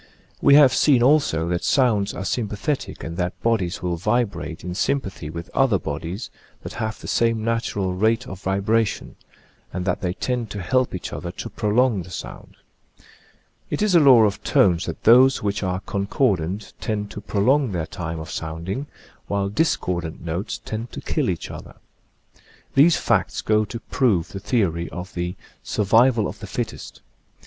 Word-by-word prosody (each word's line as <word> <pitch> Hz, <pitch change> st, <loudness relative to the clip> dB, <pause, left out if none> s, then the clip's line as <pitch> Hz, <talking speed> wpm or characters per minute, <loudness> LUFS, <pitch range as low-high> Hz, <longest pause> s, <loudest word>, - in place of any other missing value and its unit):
We 140 Hz, -, +7 dB
have 140 Hz, -4 st, +7 dB
seen 130 Hz, -5 st, +4 dB
also 130 Hz, -, +3 dB
that 85 Hz, 0 st, -1 dB
sounds 110 Hz, -7 st, +2 dB
are 95 Hz, -, -5 dB
sympathetic 115 Hz, +6 st, -2 dB
and 85 Hz, +1 st, -6 dB
that 90 Hz, 0 st, -2 dB
bodies 105 Hz, -8 st, 0 dB
will 90 Hz, -1 st, -1 dB
vibrate 100 Hz, -5 st, -1 dB
in 90 Hz, +1 st, -4 dB
sympathy 95 Hz, -, -2 dB
with 85 Hz, +2 st, -7 dB
other 130 Hz, -7 st, +3 dB
bodies 85 Hz, -, -5 dB, 0.3 s
that -, -, -7 dB
have 110 Hz, -1 st, -4 dB
the -, -, -9 dB
same 115 Hz, -1 st, +1 dB
natural 110 Hz, -5 st, -1 dB
rate 110 Hz, +6 st, +1 dB
of 95 Hz, -6 st, -9 dB
vibration, 100 Hz, +3 st, 0 dB, 0.6 s
and 90 Hz, 0 st, -4 dB
that 90 Hz, -, -1 dB
they 90 Hz, -1 st, -1 dB
tend 120 Hz, +2 st, -2 dB
to 100 Hz, -1 st, -5 dB
help 130 Hz, +3 st, +1 dB
each 90 Hz, -, -6 dB
other 85 Hz, -, -5 dB
to 115 Hz, -, -7 dB
prolong 110 Hz, -1 st, +1 dB
the 90 Hz, -, -10 dB
sound. -, -, -8 dB, 1.1 s
It -, -, -1 dB
is 210 Hz, -3 st, +2 dB
a 170 Hz, -, +7 dB
law 130 Hz, -6 st, +7 dB
of 105 Hz, -1 st, 0 dB
tones 90 Hz, -3 st, +3 dB
that -, -, -6 dB
those 130 Hz, +3 st, +6 dB
which 100 Hz, 0 st, -1 dB
are 95 Hz, -1 st, -2 dB
con 100 Hz, 0 st, -3 dB
cordant 100 Hz, -, 0 dB
tend 105 Hz, -1 st, -3 dB
to 105 Hz, -, -7 dB
prolong 120 Hz, +6 st, +2 dB
their 85 Hz, -4 st, -2 dB
time 80 Hz, 0 st, -5 dB
of 80 Hz, 0 st, -7 dB
sounding, 85 Hz, -, -4 dB, 0.4 s
while 100 Hz, -1 st, -1 dB
discordant 90 Hz, -, -1 dB
notes 85 Hz, +5 st, -3 dB
tend 110 Hz, +2 st, -5 dB
to -, -, -6 dB
kill -, -, -1 dB
each -, -, -3 dB
other. -, -, -10 dB, 1.0 s
These 155 Hz, +5 st, +5 dB
facts -, -, 0 dB
go 110 Hz, 0 st, +2 dB
to 115 Hz, +3 st, -6 dB
prove 110 Hz, -10 st, +1 dB
the 95 Hz, -, -6 dB
theory 90 Hz, -6 st, 0 dB
of 90 Hz, +4 st, -8 dB
the 90 Hz, 0 st, -3 dB, 0.2 s
" -, -, -34 dB
survival 115 Hz, +2 st, +3 dB
of -, -, -8 dB
the -, -, -8 dB
fittest." -, -, -5 dB
105 Hz, 175 wpm, -23 LUFS, 90-120 Hz, 1.1 s, We